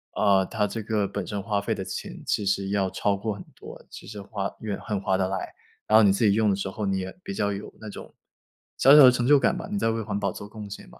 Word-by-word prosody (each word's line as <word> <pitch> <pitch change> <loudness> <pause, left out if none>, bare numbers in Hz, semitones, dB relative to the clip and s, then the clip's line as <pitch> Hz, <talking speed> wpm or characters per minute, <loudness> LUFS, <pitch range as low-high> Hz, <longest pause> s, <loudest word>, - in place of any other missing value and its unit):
呃， 100 -2 +3
它 105 +2 -1
这 115 +2 -4
个 105 -2 -1
本 100 -1 -4
身 105 -1 -3
花 100 0 -1
费 100 - -2
的 - - -5
钱 - - -7
其 - - 0
实 100 0 0
要 100 -1 0
超 100 +2 0
过 105 +2 -3
很 100 - -9
多， - - -12
其 - - -11
实 105 -1 -8
花 100 -1 -4
越 105 -2 -3
很 105 -2 -3
划 95 -1 0
得 95 -1 +1
来。 95 -1 -3 0.4
然 110 - +6
后 - - +7
你 100 - +6
自 100 +4 +1
己 100 - +5
用 110 0 +2
的 100 - +2
时 95 - -4
候， 105 +2 -4
你 95 0 0
也 95 0 -5
比 195 - -5
较 100 - 0
有 100 +1 -7
那 110 - -8
种 - - -11 0.6
小 135 +3 +7
小 150 - +10
的 130 - +9
成 125 -1 -1
就 145 +1 +7
感 - - +2
吧， - - -6
你 205 - -1
在 115 - +1
为 115 0 -1
环 100 -1 -3
保 - - -1
做 100 - -9
贡 105 -1 -8
献 100 - -9
吧。 - - -17
100 Hz, 310 characters per minute, -25 LUFS, 100-110 Hz, 0.6 s, 小